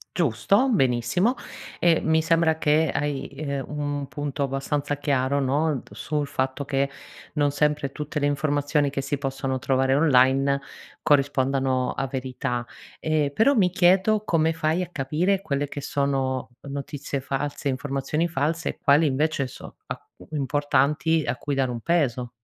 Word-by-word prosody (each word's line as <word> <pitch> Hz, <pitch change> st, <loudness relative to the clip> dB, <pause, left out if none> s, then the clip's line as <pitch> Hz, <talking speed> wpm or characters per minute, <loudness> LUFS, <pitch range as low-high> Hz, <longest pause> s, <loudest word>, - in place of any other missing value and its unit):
Giusto, 180 Hz, -, +2 dB
benissimo, 175 Hz, -, +2 dB, 0.4 s
e 170 Hz, -2 st, +4 dB
mi 160 Hz, 0 st, +2 dB
sembra 160 Hz, 0 st, +3 dB
che 155 Hz, 0 st, +2 dB
hai, 145 Hz, -2 st, -2 dB
ehm, 140 Hz, -1 st, -4 dB
un 145 Hz, -1 st, -3 dB
punto 145 Hz, 0 st, -4 dB
abbastanza 140 Hz, +2 st, -2 dB
chiaro 140 Hz, -1 st, +1 dB
no, 140 Hz, +1 st, 0 dB
sul 145 Hz, +8 st, -2 dB
fatto 135 Hz, 0 st, -2 dB
che 140 Hz, 0 st, 0 dB, 0.4 s
non 145 Hz, -2 st, +2 dB
sempre 145 Hz, -1 st, 0 dB
tutte 150 Hz, +2 st, -5 dB
le 145 Hz, -, +1 dB
informazioni 145 Hz, 0 st, +1 dB
che 135 Hz, 0 st, -3 dB
si 135 Hz, +1 st, -3 dB
possono 135 Hz, -1 st, -2 dB
trovare 130 Hz, 0 st, +2 dB
online 135 Hz, -1 st, +4 dB, 0.4 s
corrispondano 135 Hz, -2 st, +2 dB
a 135 Hz, -, -2 dB
verità. 125 Hz, -2 st, -3 dB, 0.3 s
E 155 Hz, -2 st, 0 dB
però 225 Hz, -, +4 dB
mi 200 Hz, -8 st, +3 dB
chiedo 190 Hz, +4 st, +3 dB
come 165 Hz, -4 st, +2 dB
fai 160 Hz, +2 st, 0 dB
a 180 Hz, -, -3 dB
capire 165 Hz, +7 st, 0 dB
quelle 145 Hz, -5 st, -1 dB
che 145 Hz, -, -6 dB
sono 135 Hz, -2 st, -1 dB
notizie 140 Hz, 0 st, -5 dB
false, 140 Hz, +1 st, -3 dB
informazioni 140 Hz, +4 st, -1 dB
false 160 Hz, +1 st, -1 dB
e -, -, -6 dB
quali 145 Hz, +2 st, +5 dB
invece 145 Hz, 0 st, +1 dB
so 125 Hz, -, -10 dB
a -, -, -6 dB, 0.3 s
importanti 145 Hz, +2 st, +1 dB
a -, -, 0 dB
cui 145 Hz, +3 st, -4 dB
dare 135 Hz, -2 st, +1 dB
un 120 Hz, -1 st, -4 dB
peso. 130 Hz, -8 st, 0 dB
145 Hz, 145 wpm, -25 LUFS, 135-155 Hz, 0.4 s, quali